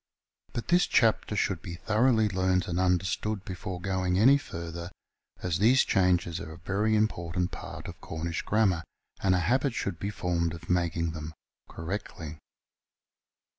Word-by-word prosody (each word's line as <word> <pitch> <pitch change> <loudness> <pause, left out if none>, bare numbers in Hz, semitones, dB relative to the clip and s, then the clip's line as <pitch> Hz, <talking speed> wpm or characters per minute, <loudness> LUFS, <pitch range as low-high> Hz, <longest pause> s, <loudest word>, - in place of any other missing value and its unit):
But 120 - -4
this 175 +1 +4
chapter 110 -2 +3
should 95 -4 0
be 85 -1 -6
thoroughly 110 +4 +3
learnt 95 -2 +1
and 85 0 -1
understood 95 +3 0
before 95 0 -5
going 95 0 0
any 130 +8 +7
further, 85 -5 -6 0.5
as 90 -2 0
these 120 +6 +5
changes 90 -3 +2
are 80 - -7
a - - -11
very 100 +5 0
important 90 -4 0
part - - -7
of - - -9
Cornish 80 +1 -3
grammar, 100 -6 +2 0.4
and 95 -1 +3
a - - +2
habit 130 +3 +1
should 90 -4 -2
be 100 - -2
formed 85 -4 -1
of 85 - -6
making 85 -2 +1
them 80 0 -7 0.3
correctly. 80 -3 -6
90 Hz, 150 wpm, -29 LUFS, 85-105 Hz, 0.5 s, any